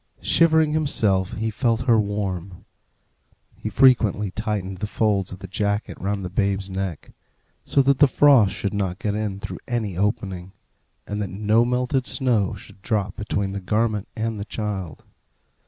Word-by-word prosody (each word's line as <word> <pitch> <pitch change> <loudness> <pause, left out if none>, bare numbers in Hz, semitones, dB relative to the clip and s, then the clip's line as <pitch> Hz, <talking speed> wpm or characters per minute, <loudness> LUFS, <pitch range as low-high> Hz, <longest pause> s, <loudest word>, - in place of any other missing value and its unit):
Shivering 160 -2 +4
himself, 105 -11 +1
he 110 +1 -2
felt 115 0 0
her 120 -3 +4
warm. 95 -3 -4 0.9
He 110 - -5
frequently 110 -4 +3
tightened 100 -3 -3
the 105 - -2
folds 105 -3 0
of 95 - -7
the 95 0 -9
jacket 100 +2 -2
round 100 0 -2
the - - -4
babe's 100 -1 -1
neck, 95 -4 -5 0.5
so 140 - +3
that 140 0 +2
the 145 - +7
frost 130 -7 +5
should 100 - -3
not 95 -3 -2
get 105 -1 -2
in 105 -2 -3
through - - -6
any 115 -7 -2
opening, 95 -1 -2 0.5
and 105 0 -4
that 100 - -3
no 105 +4 +2
melted 125 +1 0
snow 115 -7 +1
should 95 -1 -14
drop 100 -2 -1
between 100 -2 -2
the 100 0 -4
garment 105 +1 0
and 110 -1 -2
the 100 - -4
child. 100 -8 -5
105 Hz, 160 wpm, -23 LUFS, 95-115 Hz, 0.9 s, the